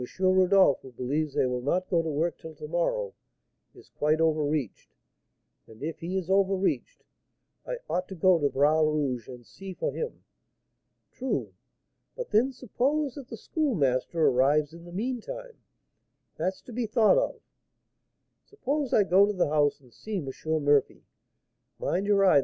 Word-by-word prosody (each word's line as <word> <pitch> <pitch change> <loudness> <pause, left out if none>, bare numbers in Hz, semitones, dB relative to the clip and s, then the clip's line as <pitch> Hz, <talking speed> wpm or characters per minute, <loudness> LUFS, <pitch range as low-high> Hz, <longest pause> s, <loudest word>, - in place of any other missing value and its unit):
Rodolph, 185 -3 +4
who 130 - -12
believes 140 +4 -2
they - - +3
will 125 -1 -1
not 180 +8 0
go 170 -2 +2
to 165 - -3
work 155 +2 -1
till 160 -1 -10
to 150 - -8
morrow, 445 - -1 0.6
is - - -17
quite 155 +1 +2
over 160 -2 +2
reached; 145 -7 -3 0.7
and 110 +4 -13
if 160 +1 -4
he 180 +3 -3
is 185 -3 -3
over 195 0 +3
reached, 195 - -2 0.6
I - - -3
ought 180 +1 -1
to 190 - -8
go 180 0 +4
to 145 -2 +2
Bras 150 +4 +3
Rouge's 145 -6 0
and 125 -2 -11
see 195 +7 -9
for - - -2
him. 470 0 -5 0.9
True; 260 0 -3 0.6
but - - -6
then 245 +6 +3
suppose 265 +3 -1
that 275 -3 -9
the 230 - -7
Schoolmaster 165 - 0
arrives 145 +4 +3
in 170 0 -12
the 175 - -11
meantime, 255 - -5 0.8
that's 185 +1 -3
to 245 - -11
be 235 0 -2
thought 220 - +4
of. - - -2 1.0
Suppose 290 - -3
I 210 - +5
go 195 +2 +5
to 210 - -1
the 180 -6 +1
house 145 -1 +2
and 125 -3 -21
see 215 -1 -5
M. 155 -7 -4 0.4
Murphy, 145 -2 +2 0.7
mind 195 +3 -1
your 200 -1 +4
eye! 180 -6 +6
180 Hz, 165 wpm, -28 LUFS, 150-220 Hz, 1.0 s, eye